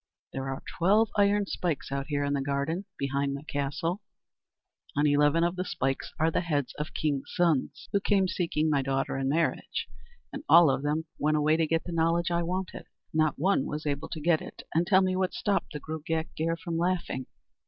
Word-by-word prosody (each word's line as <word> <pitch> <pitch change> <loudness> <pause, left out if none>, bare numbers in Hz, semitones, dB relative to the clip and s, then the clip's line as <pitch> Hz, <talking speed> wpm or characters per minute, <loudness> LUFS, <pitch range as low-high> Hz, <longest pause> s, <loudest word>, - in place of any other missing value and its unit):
There 135 0 -3
are 135 - -5 0.2
twelve 205 +5 +4
iron 205 0 +3
spikes 170 -8 -3
out 140 0 -2
here 145 -2 0
in 140 0 0
the 140 - 0
garden 140 +7 -1
behind 140 0 -1
my 140 - -7
castle. 150 +6 -2 1.0
On 145 - +3
eleven 145 +3 +4
of 175 +1 +1
the 185 - -2
spikes 135 -7 -2
are 160 +1 +3
the - - +1
heads 145 -6 -1
of 150 - -4
kings' 145 -3 -1
sons 170 -6 +1
who 200 - +2
came 195 -1 +2
seeking 165 -4 0
my 145 -3 +2
daughter 135 0 -1
in 135 0 -1
marriage, 160 +3 -1 0.5
and 280 - -6
all 170 -5 +8
of 135 - -1
them 150 +2 -1
went 155 +1 +2
away 150 +1 +3
to 160 -1 +1
get 165 +1 +1
the 175 - -6
knowledge 165 +1 +1
I 170 0 +1
wanted. 180 +2 -4 0.3
Not 155 -1 +2
one 180 -2 +2
was 150 +1 -4
able 145 0 -2
to 160 - -5
get 160 +1 +2
it - - -9
and 170 +2 +2
tell 190 -1 +5
me 185 0 +1
what 185 0 0
stopped 200 -1 0
the 150 - -4
Gruagach 160 +1 -3
Gaire 165 +1 -1
from 165 -1 -3
laughing. 175 -7 -1
160 Hz, 205 wpm, -28 LUFS, 145-175 Hz, 1.0 s, all